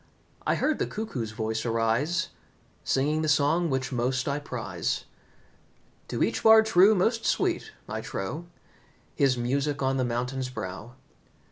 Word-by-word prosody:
I -, -, +3 dB
heard 310 Hz, -, 0 dB
the -, -, 0 dB
cuckoo's 175 Hz, -, -4 dB
voice 110 Hz, 0 st, -3 dB
arise, 120 Hz, +10 st, 0 dB, 0.5 s
Singing 150 Hz, +4 st, +1 dB
the 155 Hz, -, -1 dB
song 155 Hz, +4 st, +3 dB
which 130 Hz, -1 st, -1 dB
most 125 Hz, +1 st, 0 dB
I 140 Hz, +1 st, 0 dB
prize. 145 Hz, -, -3 dB, 1.0 s
To -, -, -1 dB
each -, -, 0 dB
Bard 220 Hz, 0 st, +7 dB
true 210 Hz, 0 st, +6 dB
most 225 Hz, +5 st, +1 dB
sweet -, -, 0 dB, 0.2 s
I -, -, -4 dB
trow 150 Hz, -, -5 dB, 0.7 s
His 135 Hz, -3 st, +2 dB
music 140 Hz, +4 st, -1 dB
on 135 Hz, 0 st, +1 dB
the 130 Hz, -, +1 dB
mountain's 125 Hz, +2 st, -2 dB
brow. 110 Hz, +1 st, -7 dB
135 Hz, 140 wpm, -27 LUFS, 120-165 Hz, 1.0 s, Bard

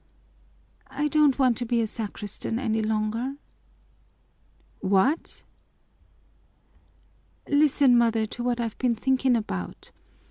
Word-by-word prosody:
"I 285 Hz, +3 st, -2 dB
don't 295 Hz, -3 st, +3 dB
want 255 Hz, -4 st, +3 dB
to 245 Hz, -, -2 dB
be 235 Hz, 0 st, +1 dB
a 230 Hz, -, +1 dB
sacristan 210 Hz, 0 st, -4 dB
any 220 Hz, -3 st, -1 dB
longer." 220 Hz, +4 st, -2 dB, 1.4 s
"What?" 200 Hz, -, 0 dB, 2.0 s
"Listen, 285 Hz, -3 st, +4 dB
mother, 225 Hz, -2 st, +2 dB
to 235 Hz, -, -7 dB
what 245 Hz, -1 st, -1 dB
I've 230 Hz, -2 st, -4 dB
been 245 Hz, -2 st, +1 dB
thinking 260 Hz, +2 st, +1 dB
about. 95 Hz, -, -5 dB
235 Hz, 105 wpm, -25 LUFS, 220-265 Hz, 2.0 s, Listen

